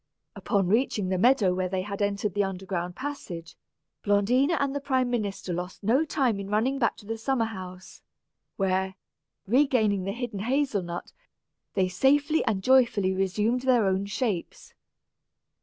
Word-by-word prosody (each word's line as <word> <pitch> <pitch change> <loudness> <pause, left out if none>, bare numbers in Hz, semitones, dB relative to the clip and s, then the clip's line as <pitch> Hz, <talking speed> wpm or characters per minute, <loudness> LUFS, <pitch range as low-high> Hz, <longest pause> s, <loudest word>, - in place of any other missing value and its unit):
Upon 200 -2 0
reaching 210 -2 +1
the 185 -1 0
meadow 225 -4 +4
where 185 0 -1
they 185 0 -2
had 200 0 -5
entered 200 -1 -1
the 205 - +1
underground 185 -2 -4
passage, 200 - -6 0.5
Blondina 245 +10 +2
and 280 -1 0
the 285 - -2
prime 260 -3 0
minister 200 -6 -2
lost 180 +4 -6
no 245 +9 +3
time 255 -8 0
in 200 0 -6
running 240 +6 +1
back 235 - +1
to - - -14
the 225 +1 -4
summer 240 0 0
house, 185 -3 -9 0.5
where, 190 -1 0 0.5
regaining 220 -5 +2
the 195 - -1
hidden 240 -2 -5
hazel 255 -1 0
nut, 175 0 -6 0.6
they 190 -2 +2
safely 285 - +2
and 190 -2 -1
joyfully 235 -7 +4
resumed 210 +6 0
their 250 -4 +3
own 190 +1 +1
true - - -8
shapes. 205 -4 -3
205 Hz, 155 wpm, -27 LUFS, 190-255 Hz, 0.6 s, meadow